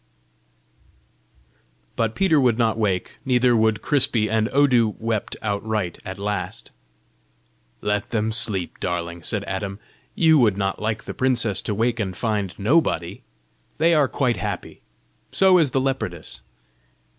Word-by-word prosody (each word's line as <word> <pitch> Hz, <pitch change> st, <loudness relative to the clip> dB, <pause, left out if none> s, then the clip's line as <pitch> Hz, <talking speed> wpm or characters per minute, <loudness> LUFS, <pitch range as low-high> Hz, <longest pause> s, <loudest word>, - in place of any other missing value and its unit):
But 115 Hz, -1 st, -1 dB
Peter 190 Hz, -6 st, +3 dB
would 125 Hz, -4 st, +3 dB
not 115 Hz, -2 st, +2 dB
wake, 100 Hz, -5 st, -2 dB
neither 125 Hz, -1 st, +3 dB
would 110 Hz, -1 st, +2 dB
Crispy, 120 Hz, -7 st, +1 dB
and 110 Hz, 0 st, +1 dB
Odu 125 Hz, -6 st, +3 dB
wept 115 Hz, -2 st, -3 dB
outright 105 Hz, -3 st, -2 dB
at 95 Hz, +1 st, -7 dB
last. 100 Hz, -2 st, -4 dB, 1.1 s
"Let 105 Hz, +3 st, -1 dB
them 110 Hz, -2 st, 0 dB
sleep, 110 Hz, -6 st, +1 dB
darling!" 85 Hz, -1 st, -3 dB
said 100 Hz, +4 st, -2 dB
Adam. 95 Hz, 0 st, -4 dB, 0.4 s
"You 160 Hz, -2 st, +5 dB
would 105 Hz, -6 st, +3 dB
not 95 Hz, -1 st, -2 dB
like 110 Hz, 0 st, -2 dB
the -, -, -6 dB
princess 120 Hz, -6 st, +1 dB
to 105 Hz, -, -3 dB
wake 115 Hz, +2 st, 0 dB
and 95 Hz, -4 st, -3 dB
find 105 Hz, -5 st, -2 dB
nobody? 100 Hz, -, +1 dB, 0.6 s
They 165 Hz, +2 st, +3 dB
are 150 Hz, -4 st, +4 dB
quite 125 Hz, -4 st, 0 dB
happy. 105 Hz, -4 st, -5 dB, 0.5 s
So 190 Hz, -2 st, +5 dB
is 155 Hz, -4 st, +3 dB
the 135 Hz, -, 0 dB
leopardess." 90 Hz, -, -3 dB
110 Hz, 135 wpm, -23 LUFS, 100-125 Hz, 1.1 s, You